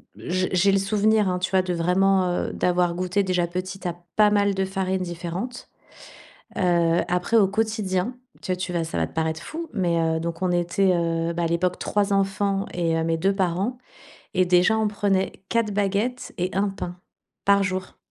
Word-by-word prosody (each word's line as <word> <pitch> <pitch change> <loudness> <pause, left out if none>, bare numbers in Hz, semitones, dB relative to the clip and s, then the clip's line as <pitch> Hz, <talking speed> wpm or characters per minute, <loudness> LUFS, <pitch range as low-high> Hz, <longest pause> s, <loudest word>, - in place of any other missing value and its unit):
j'ai 185 +1 -2
j'ai 195 +2 +4
le - - +4
souvenir 210 +1 +2
hein, 180 0 -1
tu 185 - -1
vois, 190 -1 +4
de 180 -1 -2
vraiment, 185 +3 +2
heu, 175 - -1
d'avoir 180 -1 +1
goûté 185 +2 0
déjà 180 -2 0
petit 185 +2 -5
a 175 - -2 0.2
pas 210 -1 +6
mal 200 -1 +3
de 190 0 0
farine 190 0 -1
différentes. 180 +7 -5 0.9
Heu, 170 -2 +3
après, 180 +6 +1
au 205 -3 +5
quotidien, 215 +1 -1 0.2
tu 185 -1 -3
vois, 170 -1 0
ça 160 - -4
va 80 -1 +1
te - - -19
paraître 160 0 -1
fou, 330 +1 -6
mais, 175 -5 +1
heu, 160 0 +1
donc 170 0 -4
on 185 -1 +1
était, 175 +2 +2
heu, 165 -1 0
à 170 - +1
l'époque 175 +2 0
3 205 -1 0
enfants 195 0 0
et 165 -2 0
heu, 165 - 0
mes 165 0 +1
2 195 +4 +1
parents. 190 +6 0 0.6
Et 185 - +4
déjà 180 +5 +4
on 220 -1 +2
prenait 195 -2 0 0.2
4 230 -3 +1
baguettes 205 +5 -1
et 180 +1 0
1 200 +2 +1
pain 180 -2 -6 0.5
par 200 0 +4
jour. 185 -1 -3
185 Hz, 190 wpm, -24 LUFS, 175-200 Hz, 0.9 s, pas